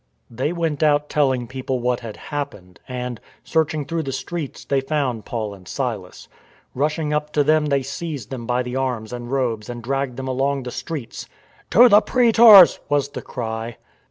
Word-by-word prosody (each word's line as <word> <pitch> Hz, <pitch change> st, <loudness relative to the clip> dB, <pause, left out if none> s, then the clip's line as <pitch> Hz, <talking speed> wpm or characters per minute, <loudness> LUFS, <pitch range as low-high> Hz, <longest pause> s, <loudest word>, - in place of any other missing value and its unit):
They 130 Hz, +7 st, -2 dB
went 165 Hz, -4 st, -2 dB
out 150 Hz, -1 st, +2 dB
telling 130 Hz, -4 st, +1 dB
people 130 Hz, +1 st, -4 dB
what 125 Hz, 0 st, 0 dB
had 115 Hz, -3 st, -8 dB
happened, 135 Hz, -, -6 dB
and, 125 Hz, -2 st, -5 dB, 0.2 s
searching 155 Hz, -2 st, 0 dB
through 165 Hz, +2 st, -2 dB
the 135 Hz, -3 st, -4 dB
streets, 150 Hz, +2 st, -5 dB
they 140 Hz, -1 st, +1 dB
found 135 Hz, -6 st, -2 dB
Paul 110 Hz, -3 st, -4 dB
and 95 Hz, -3 st, -15 dB
Silas. 115 Hz, -9 st, -5 dB, 0.5 s
Rushing 150 Hz, +2 st, -1 dB
up 150 Hz, 0 st, -1 dB
to 145 Hz, -, +3 dB
them 155 Hz, +1 st, +3 dB
they 140 Hz, -2 st, +1 dB
seized 140 Hz, -4 st, -6 dB
them 120 Hz, -3 st, -6 dB
by 125 Hz, 0 st, +1 dB
the 125 Hz, +1 st, -5 dB
arms 125 Hz, -4 st, -2 dB
and 120 Hz, -1 st, -6 dB
robes 120 Hz, -5 st, -1 dB
and 120 Hz, -1 st, -6 dB
dragged 135 Hz, 0 st, -2 dB
them 130 Hz, 0 st, -5 dB
along 135 Hz, +1 st, -1 dB
the 125 Hz, -, -6 dB
streets: 150 Hz, -6 st, -6 dB, 0.2 s
" -, -, -31 dB
To 240 Hz, +4 st, +7 dB
the 210 Hz, -2 st, +7 dB
praetors! 225 Hz, -7 st, +7 dB
" -, -, -36 dB
was 145 Hz, -1 st, +1 dB
the -, -, -7 dB
cry. 115 Hz, -1 st, -5 dB
135 Hz, 185 wpm, -21 LUFS, 120-150 Hz, 0.5 s, To